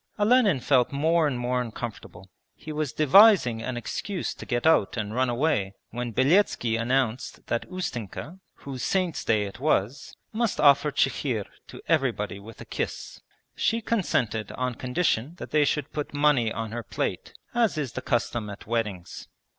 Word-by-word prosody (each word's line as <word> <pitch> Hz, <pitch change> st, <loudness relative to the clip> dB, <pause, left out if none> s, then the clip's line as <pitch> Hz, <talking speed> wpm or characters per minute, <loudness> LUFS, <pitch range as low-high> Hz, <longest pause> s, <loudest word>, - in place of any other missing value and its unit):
Olenin 210 Hz, -, +4 dB
felt 125 Hz, -1 st, +2 dB
more 160 Hz, +3 st, +2 dB
and 135 Hz, -4 st, -2 dB
more 125 Hz, +1 st, 0 dB
uncomfortable. 115 Hz, -4 st, -7 dB, 0.3 s
He 155 Hz, -, -9 dB
was 150 Hz, -3 st, -2 dB
devising 155 Hz, -, +6 dB
an 125 Hz, +1 st, -4 dB
excuse 180 Hz, -, -4 dB
to -, -, -11 dB
get 120 Hz, +1 st, -1 dB
out 160 Hz, -10 st, +3 dB
and 105 Hz, -1 st, -3 dB
run 130 Hz, +1 st, +1 dB
away 120 Hz, -7 st, 0 dB, 0.2 s
when 120 Hz, 0 st, -4 dB
Beletski 130 Hz, -, +2 dB
announced 125 Hz, +1 st, -1 dB
that 120 Hz, -, -3 dB
Ustenka, 170 Hz, -, -5 dB, 0.2 s
whose 135 Hz, -3 st, -8 dB
saint's 185 Hz, 0 st, 0 dB
day 110 Hz, -2 st, +2 dB
it 100 Hz, +2 st, -7 dB
was, 135 Hz, -2 st, -1 dB, 0.2 s
must 225 Hz, -1 st, -1 dB
offer 145 Hz, 0 st, +5 dB
chikhir 125 Hz, -6 st, 0 dB, 0.2 s
to -, -, -11 dB
everybody 125 Hz, -11 st, 0 dB
with 110 Hz, +2 st, -12 dB
a -, -, -8 dB
kiss. -, -, -5 dB, 0.3 s
She 230 Hz, -, +1 dB
consented 125 Hz, -, -1 dB
on 125 Hz, -1 st, -2 dB
condition 130 Hz, +2 st, -1 dB
that -, -, -9 dB
they 150 Hz, -1 st, +4 dB
should 150 Hz, +1 st, -2 dB
put 150 Hz, -1 st, -4 dB
money 145 Hz, -6 st, +3 dB
on 110 Hz, -1 st, -4 dB
her 120 Hz, +1 st, -4 dB
plate, 110 Hz, -, -4 dB, 0.2 s
as 235 Hz, -7 st, +2 dB
is 140 Hz, -5 st, -2 dB
the -, -, -4 dB
custom 120 Hz, -2 st, -1 dB
at 100 Hz, -, -9 dB
weddings. 105 Hz, -6 st, -3 dB
130 Hz, 160 wpm, -26 LUFS, 115-155 Hz, 0.3 s, devising